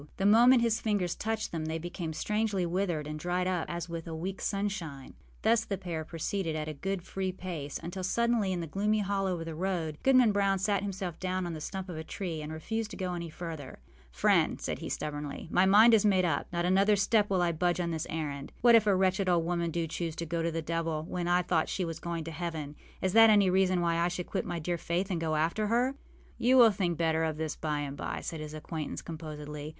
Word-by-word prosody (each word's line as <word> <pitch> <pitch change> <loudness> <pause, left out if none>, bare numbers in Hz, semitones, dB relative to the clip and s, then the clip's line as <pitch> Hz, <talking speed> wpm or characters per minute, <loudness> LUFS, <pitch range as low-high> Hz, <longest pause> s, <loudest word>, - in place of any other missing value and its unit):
The 195 - -1
moment 235 +4 +6
his 230 -1 +1
fingers 200 -5 0
touched 220 0 -3
them 160 -2 -3
they 160 +1 -2
became 170 0 -5
strangely 210 +2 0
withered 175 -3 -1
and 155 +1 -5
dried 180 +2 -1
up 180 -3 -1
as 170 0 -4
with 170 -1 -6
a 165 - -5
weekâs 185 +4 -4
sunshine. 195 -9 -3 0.3
Thus 225 +1 +4
the 200 -3 -3
pair 170 -4 -4
proceeded, 165 +1 -3
at 155 -1 -3
a 155 - -3
good 190 +4 -3
free 190 0 -3
pace, 170 -6 -5
until 175 +3 -5
suddenly, 235 0 +1
in 175 -2 -2
a - - -3
gloomy 210 +6 0
hollow 195 -3 -1
of 165 - -5
the 165 - -5
road, 165 -3 -2
Goodman 255 -4 +5
Brown 200 -1 +2
sat 200 0 +1
himself 190 -4 -4
down 185 0 -1
on 175 - -4
the 155 - -6
stump 190 +4 -5
of 175 -3 -6
a 160 - -4
tree 165 -2 -4
and 150 +1 -6
refused 220 +8 -3
to - - -8
go 185 -2 -2
any 170 -1 -4
farther. 160 -4 -7 0.3
âFriend,â - - +2
said - - -3
he, - - -5
stubbornly, 145 0 -4
âmy 185 +1 +5
mind 220 +4 +7
is 220 - +5
made 190 -3 +3
up. 160 -4 0
Not 175 0 -1
another 195 +3 +4
step 205 +1 +2
will 185 -2 +2
I 170 - +2
budge 175 +2 0
on 170 -1 -1
this 160 -1 -3
errand. 145 -3 -4
What 240 0 +7
if 225 -2 +6
a 200 - +5
wretched 190 0 +2
old 170 -2 +2
woman 170 0 0
do 165 0 -1
choose 165 0 -4
to 170 - -4
go 165 +1 -2
to 165 - 0
the 165 0 -3
devil 165 -1 -2
when 175 -1 -3
I 180 +1 +3
thought 165 -2 +1
she 185 - -1
was 165 -1 -5
going 170 -1 -4
to 165 - -6
heaven: 155 -3 -5 0.3
is 190 -1 +1
that 225 0 +8
any 205 -3 +5
reason 185 -1 +3
why 170 -1 +1
I 170 +1 +2
should 180 0 -3
quit - - -3
my 175 - -3
dear 170 +1 -2
Faith 180 +5 -1
and 170 -3 -1
go 160 -1 0
after 170 +8 0
her?â 245 +4 +2 0.5
âYou 255 +2 +5
will 235 -3 +8
think 180 -4 -1
better 160 -1 +1
of 160 -1 -1
this 155 -1 -3
by 150 -2 -2
and 140 -1 -4
by,â - - -4
said 165 - -4
his 155 0 -6
acquaintance, 155 0 -5
composedly. 150 -2 -7
175 Hz, 240 wpm, -30 LUFS, 160-195 Hz, 0.5 s, that